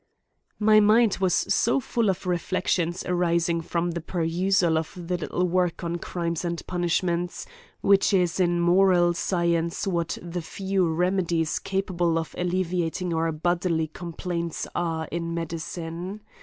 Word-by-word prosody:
MY 215 Hz, 0 st, +5 dB
mind 215 Hz, 0 st, +4 dB
was 185 Hz, -2 st, +3 dB, 0.4 s
full 235 Hz, -4 st, 0 dB
of 190 Hz, 0 st, -2 dB
reflexions 175 Hz, 0 st, 0 dB
arising 170 Hz, -1 st, +1 dB
from 170 Hz, +1 st, -1 dB
the 170 Hz, 0 st, -4 dB
perusal 175 Hz, +1 st, +1 dB
of 160 Hz, -, -5 dB
the 180 Hz, 0 st, -3 dB
little 180 Hz, +1 st, -1 dB
work 180 Hz, -1 st, 0 dB
on 170 Hz, 0 st, -2 dB
crimes 170 Hz, -1 st, -3 dB
and 170 Hz, -1 st, -3 dB
punishments, 175 Hz, 0 st, -1 dB, 0.4 s
which 200 Hz, +1 st, +4 dB
is 180 Hz, -2 st, +2 dB
in 175 Hz, -1 st, +2 dB
moral 175 Hz, 0 st, +4 dB
science, 170 Hz, -1 st, 0 dB
what 170 Hz, -4 st, -1 dB
the 175 Hz, 0 st, -5 dB
few 190 Hz, 0 st, -1 dB
remedies 170 Hz, -2 st, 0 dB
capable 175 Hz, -4 st, 0 dB
of 165 Hz, -1 st, -3 dB
alleviating 180 Hz, -1 st, -1 dB
our 165 Hz, 0 st, +1 dB
bodily 170 Hz, +1 st, 0 dB
complaints 170 Hz, 0 st, -4 dB
are 165 Hz, -2 st, -2 dB
in 170 Hz, 0 st, -3 dB
medicine. 170 Hz, +3 st, -5 dB
175 Hz, 130 wpm, -25 LUFS, 170-185 Hz, 0.4 s, MY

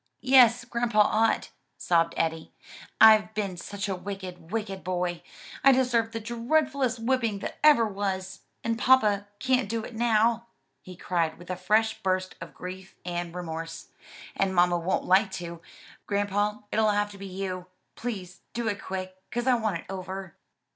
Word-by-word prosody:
"Yes, 245 Hz, -3 st, +6 dB
grandpa 235 Hz, -3 st, +1 dB
ought," 220 Hz, +2 st, +2 dB, 0.3 s
sobbed 165 Hz, -1 st, +1 dB
Eddie, 160 Hz, -1 st, -1 dB, 0.5 s
"I've 215 Hz, -1 st, +7 dB
been 200 Hz, -4 st, -2 dB
such 200 Hz, +3 st, -5 dB
a 195 Hz, -, -1 dB
wicked, 180 Hz, -3 st, -7 dB
wicked 210 Hz, -4 st, -3 dB
boy, 180 Hz, -1 st, -2 dB, 0.4 s
I 275 Hz, -, +8 dB
deserve 245 Hz, -3 st, +2 dB
the 225 Hz, -, -4 dB
dreadfulest 250 Hz, +2 st, 0 dB
whipping 230 Hz, -2 st, 0 dB
that -, -, -6 dB
ever 295 Hz, -7 st, +7 dB
was. 195 Hz, -2 st, -3 dB, 0.2 s
And 230 Hz, 0 st, -1 dB
papa 210 Hz, -6 st, +4 dB
can't 255 Hz, -2 st, +1 dB
do 225 Hz, 0 st, -2 dB
it 240 Hz, -, -8 dB
now!" 230 Hz, 0 st, +2 dB, 0.3 s
he 185 Hz, -, -11 dB
cried 170 Hz, -2 st, -1 dB
with 175 Hz, +1 st, -9 dB
a -, -, -1 dB
fresh 215 Hz, +5 st, +1 dB
burst 185 Hz, -1 st, -1 dB
of -, -, -9 dB
grief 185 Hz, +1 st, -8 dB
and 175 Hz, -1 st, -4 dB
remorse, 165 Hz, -2 st, -6 dB, 0.5 s
"and 190 Hz, -1 st, 0 dB
mamma 175 Hz, 0 st, +4 dB
won't 175 Hz, +3 st, -1 dB
like 190 Hz, +3 st, +4 dB
to. 170 Hz, -2 st, -6 dB, 0.5 s
Grandpa, 205 Hz, +1 st, 0 dB
it'll 220 Hz, 0 st, +3 dB
have 205 Hz, 0 st, +1 dB
to 200 Hz, -, -12 dB
be 195 Hz, -, -7 dB
you. 185 Hz, -1 st, -5 dB, 0.3 s
Please 195 Hz, -6 st, -6 dB
do 235 Hz, 0 st, -2 dB
it 205 Hz, -1 st, -4 dB
quick, 185 Hz, 0 st, -5 dB
'cause 240 Hz, 0 st, -2 dB
I 260 Hz, -, +4 dB
want 220 Hz, -6 st, 0 dB
it -, -, -20 dB
over." 190 Hz, -1 st, -6 dB
205 Hz, 160 wpm, -27 LUFS, 185-230 Hz, 0.5 s, I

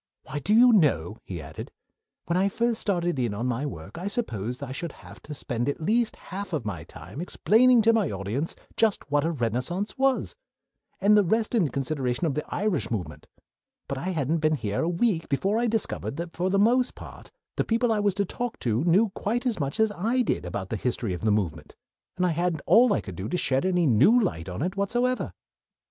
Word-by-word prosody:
Why, 145 Hz, -, -5 dB
do 180 Hz, -, -2 dB
you 245 Hz, +1 st, +7 dB
know," 125 Hz, -, +2 dB
he 90 Hz, -3 st, -6 dB
added, 70 Hz, -3 st, -8 dB, 0.5 s
"when 170 Hz, -, -1 dB
I 190 Hz, +2 st, +3 dB
first 235 Hz, +2 st, 0 dB
started 175 Hz, -6 st, 0 dB
in 115 Hz, -5 st, -1 dB
on 115 Hz, +4 st, -3 dB
my 125 Hz, +3 st, -1 dB
work 95 Hz, -, -8 dB
I 185 Hz, -, -4 dB
supposed 125 Hz, -, -3 dB
that 140 Hz, -, -6 dB
I -, -, -6 dB
should 160 Hz, +3 st, -4 dB
have -, -, -14 dB
to 150 Hz, -, -8 dB
spend 120 Hz, -1 st, -2 dB
at 145 Hz, -, -3 dB
least 220 Hz, +7 st, +1 dB
half 190 Hz, 0 st, -7 dB
of 145 Hz, -8 st, -2 dB
my 90 Hz, -6 st, -4 dB
time 135 Hz, -, -9 dB
explaining 230 Hz, +6 st, +4 dB
to 230 Hz, +1 st, +5 dB
my 215 Hz, -8 st, +2 dB
audiences 105 Hz, -, -3 dB, 0.2 s
just 210 Hz, -10 st, +1 dB
what 145 Hz, +1 st, +2 dB
a 165 Hz, -, +1 dB
Renaissance 135 Hz, -, -2 dB
was, 270 Hz, -, +1 dB, 0.7 s
and 205 Hz, +2 st, +5 dB
the 210 Hz, -, +6 dB
rest 220 Hz, +6 st, 0 dB
in 210 Hz, -9 st, +3 dB
consideration 135 Hz, 0 st, -2 dB
of 155 Hz, -, 0 dB
the 150 Hz, -, -2 dB
Irish 190 Hz, -, 0 dB
movement; 105 Hz, -7 st, -5 dB, 0.6 s
but 140 Hz, -, -3 dB
I 165 Hz, -, -5 dB
hadn't 160 Hz, -2 st, 0 dB
been 155 Hz, 0 st, +2 dB
here 105 Hz, -7 st, -2 dB
a 165 Hz, -, 0 dB
week 175 Hz, -1 st, 0 dB
before 195 Hz, +10 st, +1 dB
I 240 Hz, -, +1 dB
discovered 225 Hz, -10 st, -1 dB
that 170 Hz, +1 st, -6 dB
for 180 Hz, +2 st, 0 dB
the 195 Hz, -, +2 dB
most 245 Hz, +5 st, +3 dB
part -, -, -11 dB, 0.3 s
the -, -, +1 dB
people 230 Hz, +1 st, +1 dB
I 215 Hz, -, +2 dB
was 205 Hz, -2 st, +1 dB
to 200 Hz, 0 st, +1 dB
talk 245 Hz, +5 st, -4 dB
to 115 Hz, +2 st, 0 dB
knew 195 Hz, +6 st, +4 dB
quite 230 Hz, +6 st, -2 dB
as 235 Hz, -7 st, 0 dB
much 140 Hz, +3 st, -2 dB
as 220 Hz, -1 st, +3 dB
I 230 Hz, +7 st, 0 dB
did 150 Hz, -, -1 dB
about 95 Hz, +1 st, -4 dB
the 110 Hz, -, -2 dB
history 115 Hz, -3 st, -2 dB
of 90 Hz, -, -5 dB
the 110 Hz, -, +1 dB
movement, 85 Hz, -8 st, -2 dB, 0.4 s
and 180 Hz, -, +2 dB
I -, -, +3 dB
had 170 Hz, 0 st, 0 dB
all 240 Hz, 0 st, +6 dB
I -, -, +2 dB
could 95 Hz, -, -8 dB
do 95 Hz, +5 st, -5 dB
to 180 Hz, -, 0 dB
shed 135 Hz, +2 st, +1 dB
any 180 Hz, -2 st, +2 dB
new 145 Hz, -, +5 dB
light 95 Hz, -, -2 dB
on 90 Hz, +10 st, -3 dB
it 185 Hz, +2 st, -2 dB
whatsoever." 240 Hz, +6 st, 0 dB
170 Hz, 220 wpm, -26 LUFS, -, 0.7 s, you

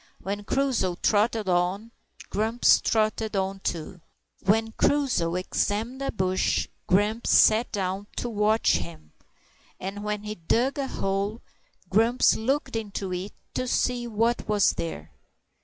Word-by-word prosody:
When 205 Hz, +1 st, -4 dB
Crusoe 255 Hz, -9 st, 0 dB
trotted 215 Hz, +2 st, +1 dB
on, 185 Hz, +5 st, 0 dB, 0.4 s
Grumps 220 Hz, +4 st, +3 dB
trotted 215 Hz, -1 st, 0 dB
on 195 Hz, 0 st, -1 dB
too. 175 Hz, 0 st, -4 dB, 0.4 s
When 225 Hz, +3 st, +2 dB
Crusoe 235 Hz, -12 st, +1 dB
examined 215 Hz, +7 st, -1 dB
a 275 Hz, -, -1 dB
bush, 185 Hz, -2 st, 0 dB, 0.2 s
Grumps 210 Hz, +5 st, +1 dB
sat 220 Hz, +2 st, +5 dB
down 195 Hz, 0 st, -3 dB
to -, -, -3 dB
watch 215 Hz, -, +2 dB
him; 80 Hz, -3 st, -9 dB, 0.7 s
and 195 Hz, +2 st, -5 dB
when 210 Hz, 0 st, -3 dB
he 210 Hz, 0 st, -4 dB
dug 235 Hz, -, 0 dB
a 275 Hz, -, -1 dB
hole, 200 Hz, +1 st, -2 dB, 0.4 s
Grumps 225 Hz, +6 st, +3 dB
looked 270 Hz, +3 st, -1 dB
into 200 Hz, -4 st, -3 dB
it 185 Hz, +3 st, -5 dB, 0.2 s
to 255 Hz, -, -2 dB
see 245 Hz, -1 st, 0 dB
what 230 Hz, +1 st, 0 dB
was 210 Hz, -2 st, +4 dB
there. 80 Hz, -1 st, -5 dB
210 Hz, 130 wpm, -26 LUFS, 190-230 Hz, 0.7 s, sat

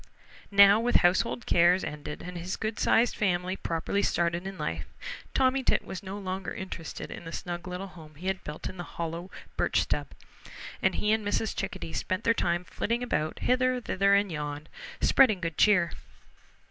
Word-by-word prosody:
Now, 200 Hz, +1 st, +7 dB
with 245 Hz, +2 st, 0 dB
household 190 Hz, +6 st, +2 dB
cares 175 Hz, +2 st, +4 dB
ended 150 Hz, 0 st, -6 dB
and 180 Hz, 0 st, -7 dB
his 175 Hz, +2 st, -3 dB
good 215 Hz, 0 st, -3 dB
sized 230 Hz, +1 st, +3 dB
family 185 Hz, -2 st, 0 dB
properly 170 Hz, +3 st, -1 dB
started 170 Hz, 0 st, 0 dB
in 195 Hz, -1 st, -6 dB
life, 80 Hz, -, -3 dB, 0.5 s
Tommy 265 Hz, 0 st, +3 dB
Tit -, -, +1 dB
was 190 Hz, -, -6 dB
no 195 Hz, 0 st, -6 dB
longer 190 Hz, -1 st, -4 dB
interested 185 Hz, -4 st, -6 dB
in -, -, -7 dB
the 165 Hz, -, -7 dB
snug 175 Hz, 0 st, -5 dB
little 180 Hz, +2 st, -4 dB
home 160 Hz, -5 st, -13 dB
he 170 Hz, +6 st, -11 dB
had 190 Hz, 0 st, -1 dB
built 150 Hz, 0 st, -6 dB
in 185 Hz, -, -9 dB
a -, -, -3 dB
hollow 170 Hz, +2 st, -5 dB, 0.3 s
birch -, -, +2 dB
stub, -, -, -1 dB, 0.7 s
and -, -, +2 dB
he 210 Hz, -, +1 dB
and 220 Hz, 0 st, +2 dB
Mrs. 205 Hz, +1 st, -1 dB
Chickadee 195 Hz, -4 st, -4 dB
spent 185 Hz, +4 st, -2 dB
their 230 Hz, -, +4 dB
time 175 Hz, -4 st, 0 dB
flitting 235 Hz, +6 st, -2 dB
about 155 Hz, -10 st, -1 dB
hither, 255 Hz, 0 st, +2 dB
thither, 200 Hz, -4 st, +3 dB
and 200 Hz, -1 st, +2 dB
yon, 150 Hz, -1 st, -4 dB, 0.4 s
spreading 230 Hz, -8 st, +5 dB
good 165 Hz, -3 st, -3 dB
cheer. 200 Hz, -5 st, +5 dB
185 Hz, 180 wpm, -28 LUFS, 170-210 Hz, 0.7 s, Now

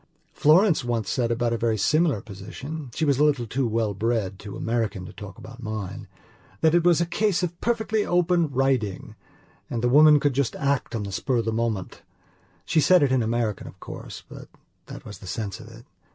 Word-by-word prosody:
Florence 165 Hz, +1 st, +4 dB
once 115 Hz, -4 st, -2 dB
said 120 Hz, -2 st, 0 dB
about 120 Hz, 0 st, 0 dB
a 115 Hz, -, -2 dB
very 115 Hz, -2 st, +1 dB
similar 150 Hz, -, +2 dB
positionshe 125 Hz, -, -7 dB
was 140 Hz, -2 st, +2 dB
a -, -, +5 dB
little 145 Hz, -5 st, +2 dB
too 125 Hz, +3 st, -1 dB
well 110 Hz, -2 st, 0 dB
bred, 100 Hz, -2 st, -1 dB
too 100 Hz, -1 st, -8 dB
American, 115 Hz, -5 st, -2 dB
to -, -, -10 dB
talk 100 Hz, -1 st, -10 dB
about 120 Hz, +2 st, -11 dB
minethat 110 Hz, -1 st, -5 dB, 0.7 s
it 175 Hz, -1 st, +4 dB
was 175 Hz, -1 st, +4 dB
a -, -, +2 dB
case 190 Hz, +1 st, 0 dB
of 175 Hz, -1 st, -4 dB
perfectly 220 Hz, -2 st, 0 dB
open 175 Hz, -3 st, +2 dB
riding 130 Hz, -7 st, -1 dB, 0.6 s
and 115 Hz, -1 st, -3 dB
the 120 Hz, -, +3 dB
woman 150 Hz, +2 st, +7 dB
could 145 Hz, -1 st, +1 dB
just 135 Hz, -2 st, 0 dB
act 140 Hz, -4 st, -1 dB
on 110 Hz, -, -2 dB
the 100 Hz, -, -5 dB
spur 125 Hz, +6 st, -1 dB
of 115 Hz, -, 0 dB
the 115 Hz, -, 0 dB
moment. 110 Hz, -5 st, -2 dB, 0.6 s
She 155 Hz, -, +2 dB
said 180 Hz, 0 st, +5 dB
it 135 Hz, -, +2 dB
in 130 Hz, -1 st, +3 dB
American 115 Hz, -2 st, -1 dB
of -, -, -12 dB
course, -, -, -9 dB
but -, -, -11 dB, 0.4 s
that -, -, -10 dB
was 105 Hz, -, -9 dB
the 95 Hz, -, -11 dB
sense 100 Hz, 0 st, -4 dB
of 115 Hz, -, -11 dB
it. 115 Hz, +1 st, -14 dB
120 Hz, 200 wpm, -25 LUFS, 110-150 Hz, 0.7 s, woman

